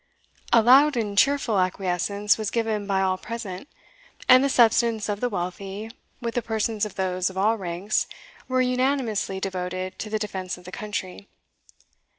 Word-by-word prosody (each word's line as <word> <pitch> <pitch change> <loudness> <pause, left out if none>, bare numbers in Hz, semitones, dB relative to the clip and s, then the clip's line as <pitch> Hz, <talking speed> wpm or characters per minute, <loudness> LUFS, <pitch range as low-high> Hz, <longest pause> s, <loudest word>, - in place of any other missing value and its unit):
A 230 -1 +6
loud 270 +4 +6
and 210 -3 -2
cheerful 255 -3 +3
acquiescence 190 +2 +1
was 215 -2 -3
given 220 -3 -1
by 195 -1 +1
all 185 -1 0
present, 230 -2 -6 0.6
and 255 0 +8
the 275 - +2
substance 230 -3 +3
of 205 -1 -2
the 245 - 0
wealthy, 195 +3 -5 0.3
with 235 -2 -3
the 245 - 0
persons 220 -1 -1
of 210 - -14
those 185 -1 0
of 190 - -10
all 215 +4 +3
ranks, 190 0 -1 0.4
were 255 0 +1
unanimously 250 -6 0
devoted 185 -1 -4
to 215 - -5
the 215 - 0
defence 190 -4 -4
of 180 - -15
the 180 - -9
country. 200 -1 -5
210 Hz, 160 wpm, -25 LUFS, 190-230 Hz, 0.6 s, and